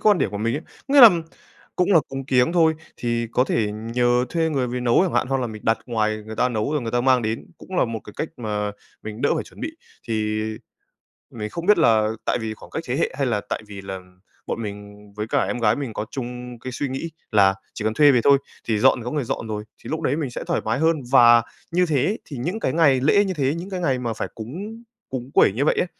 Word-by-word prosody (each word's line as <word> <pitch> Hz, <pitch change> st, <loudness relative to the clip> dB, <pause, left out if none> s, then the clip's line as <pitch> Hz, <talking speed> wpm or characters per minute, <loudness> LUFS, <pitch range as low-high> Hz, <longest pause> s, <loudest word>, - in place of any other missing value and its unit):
quan 205 Hz, -4 st, +5 dB
điểm 95 Hz, -, 0 dB
của 100 Hz, -, -5 dB
mình 115 Hz, +3 st, 0 dB
ấy. 155 Hz, -, -3 dB, 0.3 s
Có 275 Hz, -, 0 dB
nghĩa 285 Hz, -, +9 dB
là 230 Hz, -, +12 dB, 0.7 s
cũng 180 Hz, +2 st, +2 dB
là 165 Hz, -, +7 dB
cúng 135 Hz, 0 st, -5 dB
kiếng 125 Hz, +3 st, +3 dB
thôi, 160 Hz, -2 st, +4 dB, 0.2 s
thì 120 Hz, -1 st, -1 dB
có 125 Hz, -, +3 dB
thể 110 Hz, -5 st, 0 dB
nhờ 120 Hz, +3 st, +1 dB
thuê 165 Hz, -2 st, 0 dB
người 135 Hz, -5 st, 0 dB
về 125 Hz, +1 st, -3 dB
nấu 120 Hz, +6 st, +3 dB
chẳng 185 Hz, -, 0 dB
hạn -, -, +2 dB
hoặc 135 Hz, 0 st, +1 dB
là 125 Hz, -, -1 dB
mình 110 Hz, -2 st, -8 dB
đặt 115 Hz, 0 st, +2 dB
ngoài 110 Hz, -2 st, -1 dB
người 110 Hz, 0 st, -7 dB
ta 125 Hz, -, +2 dB
nấu 115 Hz, +4 st, -2 dB
rồi 150 Hz, -3 st, 0 dB
người 115 Hz, -, -3 dB
ta 120 Hz, -, +1 dB
mang 130 Hz, -1 st, +3 dB
đến 110 Hz, +1 st, -3 dB
cũng 185 Hz, -, -7 dB
là -, -, +4 dB
một 115 Hz, -2 st, -4 dB
cái 105 Hz, -, -11 dB
cách 155 Hz, -, -2 dB
mà 105 Hz, -3 st, -2 dB, 0.3 s
mình 110 Hz, +1 st, -7 dB
đỡ 145 Hz, -, +3 dB
phải -, -, -2 dB
chuẩn -, -, -15 dB
bị. 315 Hz, -, -2 dB, 0.4 s
Thì 110 Hz, -1 st, -1 dB, 0.9 s
mình 105 Hz, -2 st, -5 dB
không 170 Hz, +8 st, -6 dB
biết 210 Hz, +2 st, +5 dB
là 110 Hz, -9 st, +4 dB, 0.2 s
tại -, -, +1 dB
vì 110 Hz, -1 st, -3 dB
khoảng -, -, -14 dB
cách 160 Hz, -, -4 dB
thế 125 Hz, -, -1 dB
hệ 165 Hz, -, +1 dB
hay 140 Hz, -, +1 dB
là 110 Hz, -4 st, 0 dB
tại -, -, -2 dB
vì 100 Hz, -1 st, -8 dB
là 95 Hz, -1 st, -6 dB, 0.5 s
bọn 115 Hz, -, -3 dB
mình 105 Hz, -1 st, -7 dB, 0.2 s
với 105 Hz, +1 st, -4 dB
cả -, -, +1 dB
em 120 Hz, -, -2 dB
gái 105 Hz, -3 st, +3 dB
mình 135 Hz, -6 st, -4 dB
có 105 Hz, -, -3 dB
chung 125 Hz, -1 st, -6 dB
cái 130 Hz, -, -6 dB
suy 140 Hz, +3 st, -2 dB
nghĩ 135 Hz, +6 st, -4 dB, 0.2 s
là 95 Hz, -2 st, +5 dB, 0.2 s
chỉ 110 Hz, -, -6 dB
cần 110 Hz, -, +1 dB
thuê 145 Hz, +1 st, +6 dB
về 125 Hz, -, +3 dB
thôi, 140 Hz, -1 st, +6 dB, 0.3 s
thì 110 Hz, -2 st, +1 dB
dọn 125 Hz, -, +4 dB
thì -, -, -7 dB
có 125 Hz, -, -3 dB
người 150 Hz, -3 st, -1 dB
dọn 115 Hz, -, -4 dB
rồi, 105 Hz, -1 st, -4 dB, 0.2 s
thì -, -, -8 dB
lúc 160 Hz, +1 st, -2 dB
đấy 145 Hz, -3 st, +1 dB
mình 150 Hz, -4 st, -2 dB
sẽ -, -, -5 dB
thoải -, -, 0 dB
mái 115 Hz, +4 st, 0 dB
hơn. 165 Hz, +1 st, +3 dB, 0.2 s
Và 120 Hz, -3 st, +7 dB, 0.3 s
như 180 Hz, +2 st, +3 dB
thế 145 Hz, -6 st, +1 dB
ấy 215 Hz, -, -1 dB
thì 140 Hz, -, -8 dB
những 175 Hz, -, -3 dB
cái 130 Hz, -, -1 dB
ngày 145 Hz, -6 st, +4 dB
lễ 200 Hz, +9 st, +4 dB
như 190 Hz, -, -2 dB
thế, 145 Hz, -2 st, 0 dB
những 175 Hz, +3 st, -6 dB
cái 185 Hz, -2 st, -4 dB
ngày 135 Hz, -7 st, 0 dB
mà 120 Hz, -2 st, -2 dB
phải -, -, -4 dB
cúng 195 Hz, -, -7 dB, 0.3 s
cúng 130 Hz, 0 st, -5 dB
quẩy -, -, +5 dB
như 130 Hz, +7 st, 0 dB
vậy -, -, +3 dB
á, -, -, +2 dB
125 Hz, 270 wpm, -23 LUFS, 110-155 Hz, 0.9 s, là